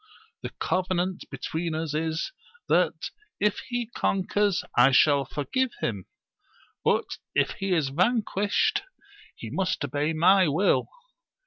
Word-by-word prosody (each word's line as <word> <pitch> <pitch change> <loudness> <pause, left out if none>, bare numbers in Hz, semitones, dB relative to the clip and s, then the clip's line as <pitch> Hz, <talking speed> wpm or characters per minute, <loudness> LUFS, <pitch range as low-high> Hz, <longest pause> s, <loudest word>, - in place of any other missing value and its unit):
The - - -4
covenant 185 0 -1
between 165 0 -3
us 160 -1 -3
is, 160 - -2 0.4
that, - - +1 0.3
if 210 0 +1
he 245 -1 -2
conquers, 205 -2 0
I 120 +2 +7
shall 140 0 +5
forgive 235 - -1
him; 100 -5 -3 0.8
but, - - +2 0.3
ff - - +3
he 195 0 -2
is 150 -5 +1
vanquished, 215 - +1 0.5
he - - -8
must 185 -1 -1
obey 150 +4 -1
my 185 +3 +5
will. 160 +8 +2
180 Hz, 120 wpm, -26 LUFS, 155-205 Hz, 0.8 s, I